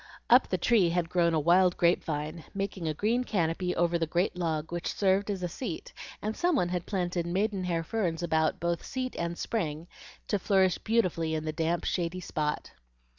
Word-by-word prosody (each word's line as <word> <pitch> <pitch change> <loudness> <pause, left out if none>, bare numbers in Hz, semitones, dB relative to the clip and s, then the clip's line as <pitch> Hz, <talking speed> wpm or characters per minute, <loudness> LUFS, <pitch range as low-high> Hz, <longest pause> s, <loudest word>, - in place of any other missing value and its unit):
Up - - +7
the - - 0
tree 215 -8 +3
had 170 0 -1
grown 170 -2 +3
a - - +3
wild 175 +3 +4
grape 170 0 +3
vine, 155 +1 -4
making 195 -3 -3
a 155 - 0
green 230 +8 +1
canopy 180 -4 -1
over 170 0 +2
the 165 - 0
great 175 +4 0
log 160 -3 -2
which 175 -1 -2
served 195 +1 +1
as 195 -3 -2
a - - +1
seat, 175 0 -6 0.3
and 215 +1 -2
some 350 -1 +2
one 180 -10 +1
had 180 -1 -3
planted 175 -3 -1
maidenhair 185 -2 0
ferns 175 -3 -2
about 160 -2 +1
both 170 0 -1
seat 255 -1 -4
and 170 0 -2
spring 165 -7 -3 0.4
to 205 - 0
flourish 190 -2 +3
beautifully 180 -8 +1
in 155 0 -3
the 155 - -2
damp, 165 +2 0
shady 175 0 -1
spot. 150 -4 -3
175 Hz, 190 wpm, -29 LUFS, 165-195 Hz, 0.4 s, Up